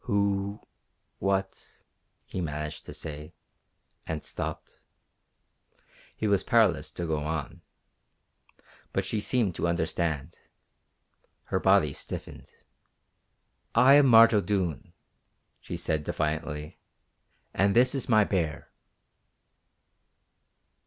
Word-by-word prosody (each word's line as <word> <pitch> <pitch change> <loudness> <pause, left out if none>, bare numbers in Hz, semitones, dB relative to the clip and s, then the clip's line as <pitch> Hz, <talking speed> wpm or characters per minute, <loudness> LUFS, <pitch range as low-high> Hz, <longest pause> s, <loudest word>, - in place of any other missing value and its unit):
"Who... 100 -2 0 0.6
what 95 0 -3 0.2
..." - - -48
he 95 - -5
managed 75 -2 -5
to - - -7
say; 75 -1 -8 0.7
and 80 -2 -4
stopped. - - -6 1.4
He - - -2
was 100 -2 +3
powerless 90 - +3
to 85 - -4
go 80 -2 -1
on. 75 -1 -4 1.3
But 95 - 0
she 105 +3 -2
seemed 110 -4 0
to - - 0
understand. 80 -2 -2 1.0
Her 95 - -1
body 95 -8 +3
stiffened. - - -8 1.3
"I 130 +2 +7
am 145 -1 +7
Marge 115 -1 +8
O'Doone," 95 - -1 0.7
she - - -6
said 80 -1 -1
defiantly, 75 0 -3 0.7
"and 100 +1 +2
this 125 +3 +5
is 135 -2 -3
my 110 -2 +6
bear!" 85 -7 -2
95 Hz, 100 wpm, -28 LUFS, 75-105 Hz, 1.4 s, Marge